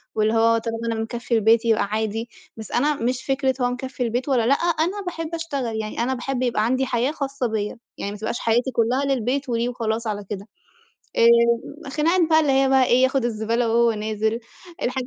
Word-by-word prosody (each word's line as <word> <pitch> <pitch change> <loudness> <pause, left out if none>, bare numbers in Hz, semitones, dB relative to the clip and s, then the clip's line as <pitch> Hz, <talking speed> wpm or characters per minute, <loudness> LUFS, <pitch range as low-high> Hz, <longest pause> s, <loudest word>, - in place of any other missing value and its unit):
واللي 215 0 +2
هو 230 0 +4
طالما 225 0 -3
أنا 225 -1 -2
مكفّي 235 +1 -3
البيت 225 +1 +4
يبقى 225 -3 +3
عادي، 220 +2 -2 0.3
بس 220 - -9
أنا 290 +5 +2
مش 250 0 -2
فِكرة 270 -1 +1
هو 245 - +2
مكفّي 255 +1 -4
البيت 245 +4 -2
والّا 245 -4 +2
لأ، 270 - +5
أنا 345 +5 0
باحب 330 -2 -4
أشتغل، 280 -8 -3
يعني 215 0 -6
أنا 260 +2 0
باحب 255 0 -3
يبقى 235 -3 +1
عَندي 260 +3 +1
حياة 245 +2 0
خاصة 275 -4 -3
بيَّ، 210 -2 -2 0.2
يعني 200 - -4
ما 205 - -7
تبقاش 220 +3 -3
حياتي 240 +3 +1
كلّها 245 +4 +1
للبيت 270 +1 -1
وليه 235 0 0
وخلاص 230 -1 -2
على 205 -1 -3
كده. 200 0 -6 0.7
آآ، 235 +5 +3
خناقات 325 +6 +2
بقى 315 0 +6
اللي 295 -3 +2
هي 270 0 +3
بقى 265 -1 +5
إيه، 250 +1 +3
ياخد 260 -1 +2
الزبالة 230 +1 0
وهو 235 +1 +3
نازِل، 220 +1 -2 0.4
الحاجات 255 0 -2
240 Hz, 200 wpm, -23 LUFS, 225-270 Hz, 0.7 s, بقى